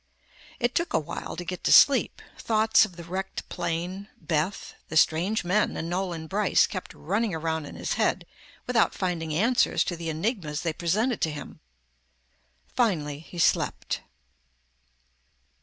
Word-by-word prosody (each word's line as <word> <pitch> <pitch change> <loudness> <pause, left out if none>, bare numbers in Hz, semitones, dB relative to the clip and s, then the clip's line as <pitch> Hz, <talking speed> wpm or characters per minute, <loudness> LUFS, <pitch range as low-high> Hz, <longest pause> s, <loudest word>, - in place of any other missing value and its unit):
It 240 0 +1
took 340 - 0
awhile 155 -2 -3
to 175 - -6
get 180 +1 -5
to - - +3
sleep. 280 -2 +6 0.2
Thoughts 220 0 +4
of 185 -5 -12
the 170 - -9
wrecked 190 +3 -5
plane, 180 +4 -3
Beth, 160 +4 -2 0.2
the 160 - -1
strange 175 +8 +3
men 185 +5 +1
and 165 +1 -4
Nolan 175 -3 -2
Brice 200 +4 +3
kept 185 - -7
running 205 +3 -1
around 160 -1 -2
in - - -10
his - - -2
head - - +1 0.4
without 245 -2 +2
finding 170 -4 -2
answers 225 +11 +2
to 175 - -3
the 165 -1 -5
enigmas 160 - -2
they 165 -2 -1
presented 215 +9 0
to 160 - +2
him. 145 -2 -8 1.2
Finally 155 - +1
he 165 +3 -12
slept. 170 - +1
175 Hz, 145 wpm, -27 LUFS, 160-210 Hz, 1.2 s, sleep